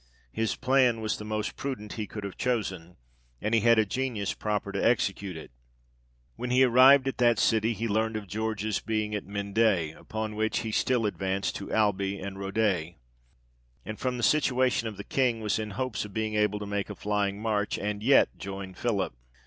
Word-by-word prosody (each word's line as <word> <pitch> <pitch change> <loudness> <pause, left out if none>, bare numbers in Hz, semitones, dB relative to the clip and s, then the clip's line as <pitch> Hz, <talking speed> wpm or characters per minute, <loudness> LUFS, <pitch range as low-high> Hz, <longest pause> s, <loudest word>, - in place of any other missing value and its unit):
His 110 - -1
plan 130 -3 +3
was 110 -1 -1
the - - -6
most 105 0 -3
prudent 115 -7 -5
he 110 -3 -4
could 105 - -7
have 100 -2 -6
chosen, 95 -8 -2 0.4
and 105 +2 -2
he 115 - +4
had 115 +1 +5
a 110 - +4
genius 115 -3 -2
proper 105 -2 -2
to - - -2
execute 100 -6 +1
it. 80 - -10 0.8
When 125 - -4
he 130 +1 +5
arrived 130 +2 +7
at 135 - -3
that 120 -1 +4
city, 110 +1 +2
he 115 +2 -3
learnt 110 +1 0
of 105 - -6
George's 110 +1 -2
being 110 -1 -2
at 105 - -4
Mende, 100 -5 +1
upon 110 -1 -5
which, 110 +1 0
he 110 - -4
still 120 +1 +1
advanced 95 -1 -1
to 100 - -7
Alby 100 -2 +1
and 95 0 -6
Rodez, 95 -4 0 0.9
and 110 - -6
from 125 -1 -1
the 120 - -4
situation 130 -2 +2
of 105 -3 -6
the 100 - -6
King, 125 -2 +1
was 110 0 -1
in 110 -1 -3
hopes 120 +3 -3
of 105 -2 -10
being 110 -1 -1
able 105 -1 +1
to 105 - -5
make 100 -1 -3
a - - -6
flying 100 -1 -1
march, 105 -2 -1
and 105 0 -3
yet 135 +5 +4
join 95 -1 -6
Philip. 100 - -1
110 Hz, 195 wpm, -28 LUFS, 100-115 Hz, 0.9 s, arrived